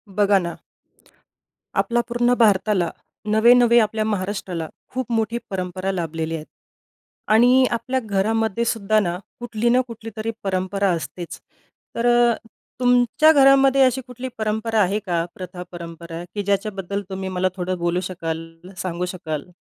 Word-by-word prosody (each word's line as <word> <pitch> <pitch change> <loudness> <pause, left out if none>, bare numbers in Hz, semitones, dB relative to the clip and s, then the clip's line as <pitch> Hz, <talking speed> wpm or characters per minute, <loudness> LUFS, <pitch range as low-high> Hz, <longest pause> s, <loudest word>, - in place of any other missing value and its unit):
बघा 205 -1 +4
ना. 170 -2 -5 1.2
आपल्या 240 0 +2
पूर्ण 240 0 +2
भारताला, 200 -4 +3 0.4
नव्हे-नव्हे 235 +2 +6
आपल्या 215 0 +1
महाराष्ट्राला 190 -5 -3 0.3
खूप 255 -2 -3
मोठी 225 0 0
परंपरा 185 0 -3
लाभलेली 165 -3 -3
आहे 155 -1 -6 0.9
आणि 250 +3 +6
आपल्या 255 +3 -1
घरामध्ये 220 +2 0
सुद्धा 215 -2 +2
ना, 175 -4 -1 0.2
कुठली 240 -1 -1
ना 250 +2 +4
कुठलीतरी 225 -1 -5
परंपरा 195 +1 0
असतेच. 170 +1 -5 0.6
तर 235 +1 +1 0.7
तुमच्या 250 +5 +4
घरामध्ये 275 -2 +5
अशी 260 0 +2
कुठली 250 +1 -6
परंपरा 220 +1 0
आहे 200 +2 +1
का? 170 -3 0
प्रथा-परंपरा 170 -2 -8
की 205 - -1
ज्याच्याबद्दल 200 -1 -2
तुम्ही 190 0 -4
मला 185 0 0
थोडं 185 0 -2
बोलू 175 +1 0
शकाल, 165 -2 -4 0.3
सांगू 180 -1 -3
शकाल? 160 -3 -5
205 Hz, 125 wpm, -22 LUFS, 180-235 Hz, 1.2 s, नव्हे-नव्हे